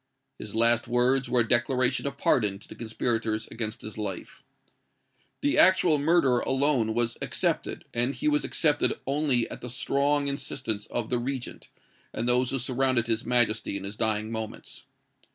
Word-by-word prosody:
His - - -8
last 115 +1 +4
words 125 +2 +1
were 125 -1 +3
a 115 - -1
declaration 125 +3 +1
of 140 0 -5
pardon 105 -8 +2
to 100 - -16
the - - -10
conspirators 110 -1 -2
against 110 -1 -3
his 110 0 -8
life. 100 -4 -6 1.0
The 145 - +2
actual 180 -4 +5
murderer 145 -5 +3
alone 130 -5 +1
was 120 0 -1
excepted; - - -2
and 120 +4 0
he 305 - -2
was 300 0 +2
excepted 150 -2 +1
only 135 -3 +1
at - - -8
the 125 - -6
strong 140 +3 0
instance 125 -6 -3
of 120 -2 -4
the 125 - +1
regent, 130 0 -5 0.4
and 115 - -3
those 125 +1 +2
who 135 - -1
surrounded 130 -1 0
his 115 -1 -2
Majesty 115 -4 +1
in 95 - -8
his 100 +2 -6
dying 110 -1 -1
moments. 110 -1 -7
120 Hz, 165 wpm, -27 LUFS, 110-135 Hz, 1.0 s, actual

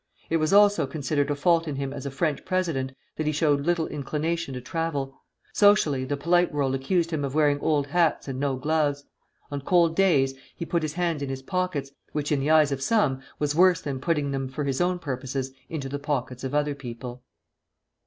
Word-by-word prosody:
It 165 - +4
was 155 0 0
also 205 -6 +5
considered 145 0 -1
a 145 - +1
fault 165 +3 +2
in 150 - -3
him 135 0 -3
as 140 0 -5
a - - -2
French 145 +1 -1
president 165 -9 -1 0.2
that 155 - -2
he - - +3
showed 145 -1 +1
little 175 -2 +2
inclination 150 +1 -3
to - - -4
travel. 140 0 -3 0.3
Socially, 205 -11 +4
the 145 +2 -2
polite 175 +4 +2
world 140 -2 0
accused 165 +6 0
him 155 -3 -1
of 140 0 -3
wearing 145 -2 +3
old 150 -2 +1
hats 165 +2 +1
and 130 -1 -4
no 140 -1 0
gloves. 145 +1 0 0.5
On 145 -1 -3
cold 170 +1 +3
days 150 -9 +3 0.2
he 170 - -5
put 170 0 0
his 155 -1 -3
hands 170 -3 -1
in 140 - -3
his 135 0 -5
pockets, 180 -5 -2 0.2
which 150 0 -2
in 145 - +2
the 140 +3 -1
eyes 155 -2 +5
of 135 -1 -2
some 135 -7 +2 0.2
was 145 -1 0
worse 180 +2 +5
than 135 -3 -4
putting 150 -2 0
them 135 -1 -2
for 135 +3 -4
his 135 0 -1
own 180 +1 +1
purposes 135 -3 -4 0.2
into 145 -4 -4
the 140 +1 -4
pockets 130 -3 -3
of 135 +2 -3
other 150 0 +1
people. 125 -2 -8
145 Hz, 210 wpm, -26 LUFS, 135-165 Hz, 0.5 s, also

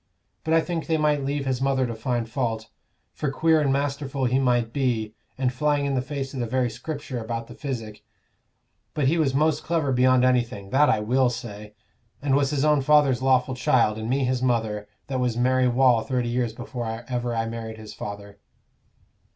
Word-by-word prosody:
But 160 +1 +2
I 165 - +5
think 165 -1 -4
they 160 -1 +2
might 150 -2 +1
leave 140 +1 -2
his 130 -1 -1
mother 135 -1 +2
to 120 - -3
find 115 +1 -2
fault; 115 -3 -3 0.4
for 150 - -2
queer 160 +3 +3
and 140 -2 +2
masterful 140 -1 -1
he 130 +2 +2
might 120 -3 +1
be, 115 -6 -1 0.2
and 130 -1 0
flying 145 +2 +1
in 140 - 0
the 130 - +1
face 140 0 -5
of 135 - -5
the 120 - -1
very 125 0 0
Scripture 145 +1 -5
about 115 0 -4
the - - -11
physic, 115 -7 -6 0.9
but 150 - +1
he 165 +4 +2
was 135 -4 +1
most 155 +1 +2
clever 160 -5 0
beyond 130 0 +4
anything 120 -5 0
that 145 +3 +4
I 105 - +2
will 125 +4 +2
say 105 -3 -8 0.4
and 140 -1 0
was 140 -1 +2
his 145 -1 0
own 150 -2 +4
father's 140 -3 +4
lawful 130 0 +2
child, 120 -3 +2
and 110 +1 -4
me 135 +2 +1
his 130 0 0
mother, 110 -4 0 0.2
that 130 -2 -3
was 125 -2 0
Mary 130 +1 +3
Wall 125 -1 +4
thirty 125 -1 -1
years 120 -2 -1
before 120 -1 -5
ever 120 -2 -2
I 115 0 0
married 115 -1 -6
his 110 -1 -10
father." 100 0 -8
130 Hz, 200 wpm, -25 LUFS, 115-140 Hz, 0.9 s, I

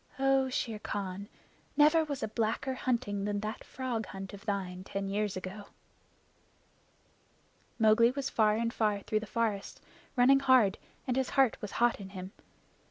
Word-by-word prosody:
"Oh, 270 -1 +3
Shere 230 -4 -2
Khan, 200 0 -5 0.5
never 305 +2 +6
was 285 -3 -4
a - - 0
blacker 225 +4 -1
hunting 235 -6 -1
than 205 0 -1
that 215 +1 -5
frog 245 -4 -4
hunt 195 0 -8
of 200 +2 -11
thine 185 -3 -3
ten 195 0 -4
years 205 0 -1
ago!" 190 +3 -7 2.1
Mowgli 225 +1 +5
was 275 +1 -3
far 215 -1 +3
and 230 +1 -1
far 210 -2 +1
through 215 - 0
the 215 - -8
forest, 220 -3 -2 0.4
running 265 +2 +6
hard, 255 -7 +4 0.3
and 250 - 0
his 265 -1 0
heart 265 -4 +5
was 210 - -6
hot 240 -1 +2
in 195 -1 -8
him. 185 -1 -8
220 Hz, 160 wpm, -31 LUFS, 200-255 Hz, 2.1 s, never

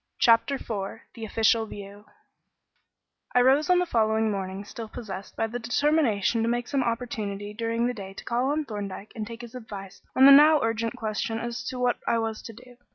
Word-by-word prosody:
Chapter 230 +4 +4
IV 215 -4 -5
The 225 -2 -7
Official 225 +1 +2
View 205 0 -10 1.3
I 250 - +6
rose 270 +5 +4
on 360 - +5
the 360 - +2
following 220 -6 +1
morning 195 0 -4
still 225 +1 -8
possessed 200 -5 -8
by - - 0
the 235 +2 -4
determination 235 -3 +1
to 230 - +1
make 240 0 -1
some 275 -2 0
oportunity 215 -4 -3
during 230 +1 -1
the 245 - 0
day 195 -4 -9
to - - -10
call 245 +3 0
on 300 +1 0
Thorndyke 205 -3 -6
and 215 -2 -5
take 230 0 -8
his 235 -1 -10
advice 205 -6 -9
on 265 - +7
the 280 - +10
now 300 +2 +8
urgent 225 +1 -1
question 225 -1 -3
as 235 +1 -4
to 255 - -4
what 250 -1 +1
I 230 - +2
was 225 -1 -2
to 225 - -9
do. 245 +2 -16
230 Hz, 200 wpm, -26 LUFS, 210-245 Hz, 1.3 s, the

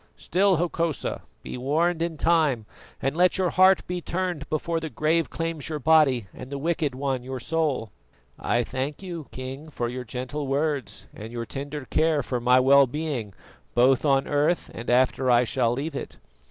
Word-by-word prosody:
Still, 190 +2 +2
Hokosa, 170 -2 -1 0.2
be - - -6
warned 160 +6 +1
in 165 -1 -2
time 155 -9 +2 0.4
and 135 +2 0
let 180 +3 +3
your 185 -2 +1
heart 185 +1 +5
be 180 0 -4
turned 175 -4 -3
before 165 +2 -1
the 160 -1 -5
grave 160 +2 +1
claims 165 -3 -3
your 155 - -2
body 150 -6 +4
and 125 - -9
the 140 - -3
Wicked 155 -2 -1
One 135 -1 -1
your 130 +1 -6
soul." 140 -6 -1 0.5
"I 120 0 +1
thank 135 +8 -4
you, 170 -5 -6
King, 130 +4 -7
for 120 -5 -3
your 125 +1 -5
gentle 130 +4 -5
words 140 -1 -1
and 110 +2 -9
your 120 -1 -4
tender 145 +3 -6
care 155 -1 +1
for 125 0 -2
my 125 +2 +4
well 135 +1 +6
being 130 -7 -4 0.4
both 125 +2 +4
on 135 -2 +2
earth 150 +4 +1
and 120 - -6
after 130 +1 +3
I 120 0 +5
shall 120 -1 +1
leave 140 +4 -4
it. - - -6
145 Hz, 180 wpm, -25 LUFS, 130-165 Hz, 0.5 s, well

